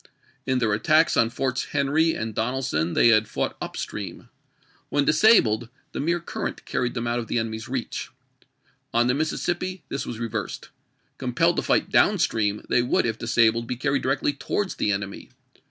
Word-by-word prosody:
In 130 -1 +2
their 115 -4 +1
attacks 155 +9 +3
on 115 - +3
Forts 130 +1 -2
Henry 155 +4 +1
and 110 0 -4
Donelson 110 -9 -1
they 120 - +6
had 110 -1 +4
fought - - -2
up - - -5
stream; - - -6 0.6
when 145 -1 +1
disabled, 135 - +4 0.2
the - - -5
mere 170 +4 +1
current 170 - -5
carried 125 0 -2
them 120 -1 -2
out 120 +1 0
of 115 - -5
the - - -1
enemy's 110 -1 -3
reach. - - -4 0.9
On 120 +1 +4
the 125 - +2
Mississippi 175 +5 -2
this 140 - -4
was 120 - -5
reversed. 115 -1 -4 0.5
Compelled - - +1
to - - +2
fight - - +1
down - - +4
stream, 105 -2 0
they 125 - +3
would, 125 - +1
if 110 -1 -2
disabled, 115 0 +2
be 125 - -2
carried 140 +2 0
directly 135 +2 0
towards 190 +7 -2
the 105 - +1
enemy. 100 0 -4
120 Hz, 175 wpm, -24 LUFS, 110-140 Hz, 0.9 s, they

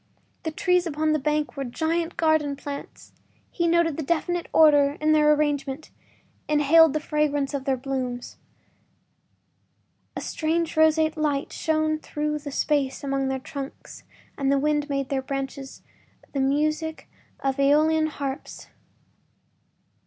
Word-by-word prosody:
The 320 - -3
trees 360 +2 +1
upon 310 0 0
the 305 - +1
bank 300 +1 -1
were 275 - -3
giant 325 +6 -2
garden 315 -3 +2
plants; 280 0 -9 0.4
he 340 -2 0
noted 335 -2 +2
a - - 0
definite 340 +3 -1
order 290 -2 +5
in 310 0 +2
their 300 -1 +5
arrangement, 290 -1 -1 0.6
inhaled 300 +1 +5
the 310 - 0
fragrance 295 -2 -1
of 275 -2 -3
their 270 -2 +1
blooms. 255 -2 -4 1.8
A - - -3
strange 325 +1 -1
roseate 315 0 +3
light 295 -2 -1
shone 310 -1 0
through 300 0 -3
the 290 0 -7
spaces 280 -1 0
among 275 -1 -1
their 265 0 -1
trunks 275 0 -8 0.4
and 275 0 +1
the 280 - +3
wind 295 +1 0
made 275 -1 0
in 270 - -7
their 270 -1 0
branches 270 0 -6 0.5
the 280 - -3
music 305 +4 0 0.3
of 270 0 -1
AEolian 310 +3 +3
harps. 280 -3 -6
300 Hz, 140 wpm, -25 LUFS, 275-315 Hz, 1.8 s, order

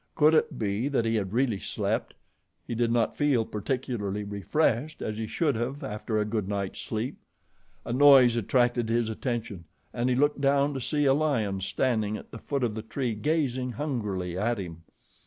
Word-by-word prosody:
Could 155 +1 +5
it 155 - +2
be 105 +3 -1
that 135 -5 0
he 115 - +1
had 95 -3 -2
really 120 -3 +1
slept? - - -2 0.5
He - - -4
did 115 0 +1
not 115 -1 +1
feel 140 -6 +2
particularly 105 -3 -3
refreshed 115 +7 0
as 110 - -3
he 110 - -3
should 145 +6 +1
have 130 +6 -3
after 110 -2 -3
a 105 - +1
good 105 -2 -2 0.2
sleep. 115 +3 -4 0.7
A 120 - -3
noise 130 -3 +7
attracted 120 +1 +1
his 115 -1 +1
attention, 110 -6 -4 0.3
and 120 +1 0
he 125 - +2
looked 145 +2 +2
down 140 +1 +3
to 135 - -4
see 145 +3 0
a 135 - +5
lion 115 -10 0
standing 110 0 0
at - - -13
the 115 - -8
foot 140 +1 -2
of 115 -3 0
the 110 - -4
tree 120 +2 -3
gazing 130 0 -1
hungrily 105 - -3
at 115 +3 0
him. 85 -4 -7
120 Hz, 180 wpm, -27 LUFS, 105-135 Hz, 0.7 s, noise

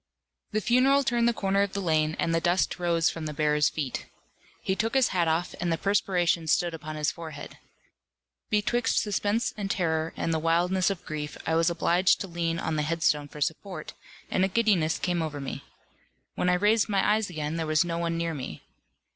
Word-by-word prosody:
The 215 0 0
funeral 265 +5 +4
turned 235 -2 +2
the - - +4
corner 195 -3 0
of 200 -1 -1
the 200 - -2
lane, 155 -4 +1
and 165 - 0
the 165 - +1
dust 175 +2 +1
rose 170 -2 +2
from 160 -2 -5
the 150 - -6
bearers' 150 -1 +2
feet. 140 -5 -4 0.6
He 190 - 0
took 225 +5 -1
his 265 -2 +4
hat 175 -3 +1
off, 165 +2 0
and 175 -1 0
the 165 - +1
perspiration 180 -4 +1
stood 170 +2 +2
upon 155 -1 -6
his 150 -1 0
forehead. 160 -3 -9 0.9
Betwixt 225 +3 +1
suspense 210 +2 0
and 200 -2 -4
terror, 160 -4 0
and 165 - -1
the 160 - +1
wildness 175 +3 +2
of 185 -3 -5
grief, 150 -1 -5
I 160 - 0
was 165 +1 +3
obliged 175 +2 +2
to 195 - -4
lean 170 -1 -2
on 160 -2 -2
the - - +1
headstone 150 -2 +1
for 150 +1 -11
support, 160 +2 -3 0.4
and 185 - +2
a - - +4
giddiness 195 -6 +2
came 175 -2 -1
over 155 -2 -4
me. 135 - -6 0.7
When 180 - 0
I 180 - +4
raised 210 +4 +2
my 195 -2 +2
eyes 215 -1 +2
again, 155 -1 -3
there 160 -1 -2
was 155 +2 +3
no 170 -1 -2
one 170 0 -1
near 165 0 -1
me. 130 - -7
170 Hz, 205 wpm, -27 LUFS, 160-195 Hz, 0.9 s, funeral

